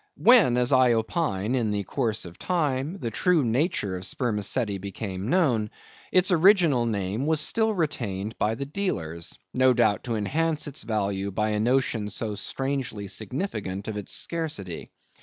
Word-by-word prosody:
When, 220 - +6
as 125 +1 +2
I 130 -2 +5
opine, 110 - -1
in 120 -4 +1
the 105 -1 -1
course 110 +2 -1
of 85 0 -11
time, 150 -1 -1
the 120 -8 -4
true 170 - +2
nature 115 - 0
of 90 - -6
spermaceti 105 -1 -1
became 100 0 -5
known, 130 -12 +2 0.4
its 185 +1 +3
original 170 - +5
name 105 +4 -2
was 160 -1 +2
still 220 +8 +1
retained 110 - -2
by 110 +1 +1
the 140 - -4
dealers; 85 - -3 0.2
no 130 0 +4
doubt 110 -4 +2
to 115 - -1
enhance 155 +9 0
its 145 0 -4
value 100 -3 -1
by 105 +2 -1
a 105 - 0
notion 120 -2 +1
so 110 0 -3
strangely 130 -2 -3
significant 105 - -4
of 110 - -4
its 105 -2 -5
scarcity. 150 - -2
120 Hz, 160 wpm, -26 LUFS, 105-150 Hz, 0.4 s, When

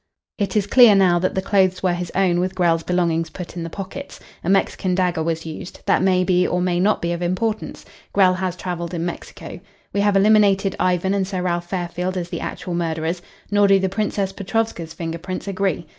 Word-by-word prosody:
It 200 -1 -1
is 210 -2 +2
clear 235 -1 +7
now 180 -3 +4
that 185 +1 -1
the 190 - -1
clothes 190 -2 +2
were 180 -2 +2
his 175 0 -4
own 180 -2 +2
with 185 +1 -1
Grell's 170 -3 +2
belongings 165 -2 0
put 180 -1 -8
in 175 - -4
the 165 - -4
pockets. 195 - -8 0.2
A 170 - -2
Mexican 190 -1 +1
dagger 180 -3 +1
was 165 0 -2
used. 160 +2 -8
That - - +3
may 185 -1 +3
be 180 -1 +2
or 180 - 0
may 180 -1 0
not 200 +1 +2
be 170 - 0
of 170 0 -3
importance. 210 +5 -2 0.3
Grell 190 -2 +4
has 185 -1 -2
travelled 175 -1 -4
in 165 0 -2
Mexico. 175 - -7 0.3
We 200 - +1
have 205 -1 +3
eliminated 200 -1 +4
Ivan 185 +1 +1
and 195 -2 0
Sir 185 -2 -3
Ralph 175 -1 -2
Fairfield 180 0 -3
as 175 -1 -4
the - - -4
actual 180 - -5
murderers. 165 0 -2 0.3
Nor 205 0 +4
do 195 0 +6
the 190 0 0
Princess 200 -1 -1
Petrovska's 195 -5 -3
finger 165 0 -4
prints 185 +3 -6
agree. 195 -3 -1
185 Hz, 210 wpm, -21 LUFS, 175-195 Hz, 0.3 s, clear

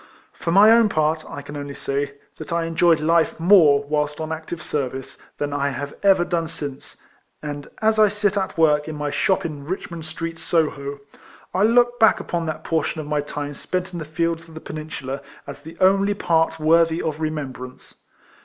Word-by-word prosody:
For 165 - -3
my 205 +5 +7
own 230 -1 +5
part, 155 -2 +1
I 145 - -7
can 145 +1 -9
only 145 -1 -6
say, 140 +1 -3 0.2
that 155 - -9
I 170 0 0
enjoyed 165 0 +3
life 165 +2 +2
more 165 -6 +6
whilst 150 +1 -1
on 155 0 -4
actice 160 0 -5
service, 135 -1 -4 0.2
than 145 0 -2
1 140 -1 -1
have 140 +3 -5
ever 190 -3 +4
done 170 -2 -1
since; 145 -4 -7 0.5
and 145 -1 -5 0.2
as 220 0 +3
I 215 -1 +6
sit 205 0 0
at 190 -3 -2
work 150 -2 +3
in 155 - -5
my 150 -1 -3
shop 190 +4 +1
in 150 -4 -5
Richmond 170 0 -5
Street, 165 +1 -5
Soho, 145 -4 -1 0.5
I 185 - +1
look 240 +2 +4
back 220 -2 +5
upon 170 -1 -3
that 155 - -4
portion 160 0 -1
of 155 - -5
my 150 0 0
time 145 0 -5
spent 185 +5 -4
in 175 - -4
the - - -4
fields 165 +2 -2
of 160 - -15
the - - -6
Peninsula 155 -4 -6 0.2
as 140 0 -9
the 160 +2 -11
only 195 +2 +3
part 165 -3 +1
worthy 165 +1 +3
of 155 -1 -3
remembrance. 135 -5 -5
160 Hz, 190 wpm, -22 LUFS, 145-175 Hz, 0.5 s, my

